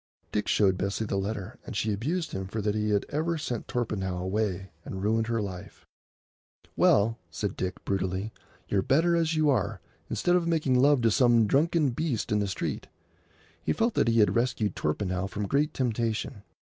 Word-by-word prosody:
Dick 105 Hz, -, -1 dB
showed 95 Hz, -3 st, +3 dB
Bessie 100 Hz, +3 st, -1 dB
the 100 Hz, -, -2 dB
letter, 100 Hz, +2 st, -3 dB
and -, -, -8 dB
she 105 Hz, +1 st, 0 dB
abused 155 Hz, -, -2 dB
him 95 Hz, 0 st, -4 dB
for 110 Hz, +3 st, -4 dB
that 105 Hz, 0 st, 0 dB
he 105 Hz, 0 st, 0 dB
had 100 Hz, -1 st, +1 dB
ever 165 Hz, +3 st, -1 dB
sent 125 Hz, -7 st, -4 dB
Torpenhow 100 Hz, -6 st, -2 dB
away 95 Hz, 0 st, -2 dB
and 95 Hz, 0 st, -6 dB
ruined 110 Hz, +1 st, +1 dB
her 115 Hz, -2 st, 0 dB
life. 95 Hz, -3 st, -8 dB, 0.9 s
"Well," 115 Hz, -, +3 dB
said 100 Hz, -2 st, -3 dB
Dick, 95 Hz, 0 st, -4 dB
brutally, 95 Hz, +2 st, -2 dB, 0.3 s
"you're 100 Hz, -, +1 dB
better 165 Hz, -, +3 dB
as 165 Hz, -1 st, +1 dB
you 155 Hz, -2 st, +3 dB
are, 110 Hz, -6 st, 0 dB, 0.3 s
instead 175 Hz, -, +1 dB
of 175 Hz, -2 st, +1 dB
making 150 Hz, -6 st, +2 dB
love 145 Hz, -1 st, +5 dB
to 115 Hz, -, +4 dB
some 120 Hz, -2 st, +4 dB
drunken 150 Hz, +4 st, +2 dB
beast 125 Hz, -5 st, -2 dB
in 105 Hz, -, +3 dB
the 100 Hz, -, 0 dB
street." 95 Hz, -, -3 dB, 0.7 s
He -, -, 0 dB
felt 230 Hz, 0 st, +1 dB
that -, -, +2 dB
he 115 Hz, -1 st, +4 dB
had 105 Hz, -, +3 dB
rescued 115 Hz, -5 st, 0 dB
Torpenhow 90 Hz, +4 st, -1 dB
from 100 Hz, +2 st, -4 dB
great 145 Hz, +5 st, +1 dB
temptation. 115 Hz, -3 st, -2 dB
110 Hz, 180 wpm, -28 LUFS, 100-135 Hz, 0.9 s, love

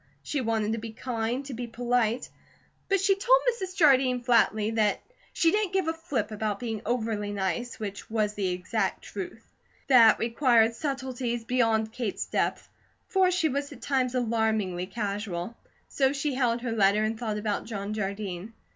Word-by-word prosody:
She 290 Hz, -, -2 dB
wanted 220 Hz, -2 st, 0 dB
to 225 Hz, -, -1 dB
be 225 Hz, 0 st, -7 dB
kind, 240 Hz, +2 st, -3 dB
to 270 Hz, -, -6 dB
be 240 Hz, 0 st, -5 dB
polite, 240 Hz, 0 st, 0 dB, 0.6 s
but 390 Hz, 0 st, +3 dB
she 390 Hz, +1 st, +4 dB
told -, -, +4 dB
Mrs. 380 Hz, -5 st, -6 dB
Jardine 260 Hz, -7 st, +4 dB
flatly 225 Hz, -3 st, +3 dB
the 215 Hz, -2 st, +2 dB, 0.3 s
"she 330 Hz, -2 st, +3 dB
didn't 415 Hz, -2 st, 0 dB
give 380 Hz, -4 st, +1 dB
a 325 Hz, -, +1 dB
flip 260 Hz, -10 st, -3 dB
about 210 Hz, -1 st, -2 dB
being 225 Hz, -3 st, -4 dB
overly 220 Hz, -3 st, -1 dB
nice," 205 Hz, +5 st, -2 dB
which 200 Hz, -2 st, -6 dB
was 215 Hz, -2 st, 0 dB
the 200 Hz, -2 st, -1 dB
exact 185 Hz, +3 st, -2 dB
truth. 205 Hz, +3 st, -7 dB, 0.4 s
That 235 Hz, -4 st, +7 dB
required 230 Hz, -1 st, +3 dB
subtleties 255 Hz, -3 st, -3 dB
beyond 225 Hz, -2 st, +1 dB
Kate's 235 Hz, -5 st, -3 dB
depth, -, -, -1 dB, 0.4 s
for 380 Hz, -1 st, +4 dB
she 355 Hz, -3 st, +2 dB
was 280 Hz, 0 st, -2 dB
at -, -, -11 dB
times 260 Hz, -3 st, 0 dB
alarmingly 220 Hz, -6 st, 0 dB
casual. 200 Hz, -1 st, -4 dB, 0.3 s
So 270 Hz, -1 st, +1 dB
she 285 Hz, 0 st, -1 dB
held 245 Hz, -2 st, +1 dB
her 240 Hz, -1 st, -3 dB
letter 210 Hz, -1 st, +3 dB
and 220 Hz, +1 st, 0 dB
thought 220 Hz, -3 st, -2 dB
about 210 Hz, -1 st, -2 dB
John 205 Hz, -2 st, -4 dB
Jardine. 200 Hz, -1 st, -4 dB
230 Hz, 165 wpm, -27 LUFS, 210-260 Hz, 0.6 s, That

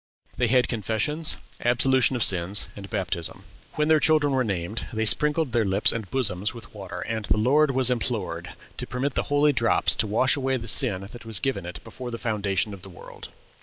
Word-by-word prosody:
They 125 Hz, 0 st, +1 dB
had 125 Hz, +1 st, +3 dB
confessions, 115 Hz, -, -2 dB, 0.3 s
absolution 130 Hz, +2 st, +2 dB
of 120 Hz, -, +1 dB
sins, 95 Hz, +2 st, +1 dB
and 100 Hz, -1 st, -10 dB
baptism. 90 Hz, -5 st, -3 dB, 0.3 s
When 150 Hz, 0 st, 0 dB
their 155 Hz, -1 st, +4 dB
children 150 Hz, -2 st, +3 dB
were 130 Hz, -1 st, +1 dB
named, 100 Hz, 0 st, -4 dB
they 110 Hz, 0 st, -2 dB
sprinkled 150 Hz, +4 st, +2 dB
their 115 Hz, 0 st, +1 dB
lips 100 Hz, +1 st, +3 dB
and 110 Hz, -5 st, -5 dB
bosoms 105 Hz, -4 st, +1 dB
with 115 Hz, -4 st, -12 dB
water, 100 Hz, -3 st, -8 dB
and 110 Hz, -2 st, -3 dB
"the -, -, +1 dB
Lord 140 Hz, +7 st, +3 dB
was 130 Hz, -1 st, +3 dB
implored 100 Hz, -8 st, -3 dB, 0.2 s
to -, -, -4 dB
permit 130 Hz, +3 st, -2 dB
the -, -, 0 dB
holy 145 Hz, +1 st, +3 dB
drops 115 Hz, -3 st, +3 dB
to 110 Hz, -, +1 dB
wash 115 Hz, +5 st, +2 dB
away 135 Hz, -1 st, -1 dB
the 115 Hz, -1 st, -8 dB
sin 95 Hz, -2 st, +4 dB
that 105 Hz, +4 st, -10 dB
was 115 Hz, -3 st, -4 dB
given 130 Hz, -10 st, -3 dB
it 90 Hz, -, -8 dB
before 120 Hz, +2 st, -8 dB
the 115 Hz, -, -5 dB
foundation 105 Hz, -3 st, -1 dB
of 100 Hz, -, -10 dB
the 95 Hz, -, -11 dB
world." 90 Hz, -, -12 dB
115 Hz, 205 wpm, -25 LUFS, 100-130 Hz, 0.3 s, their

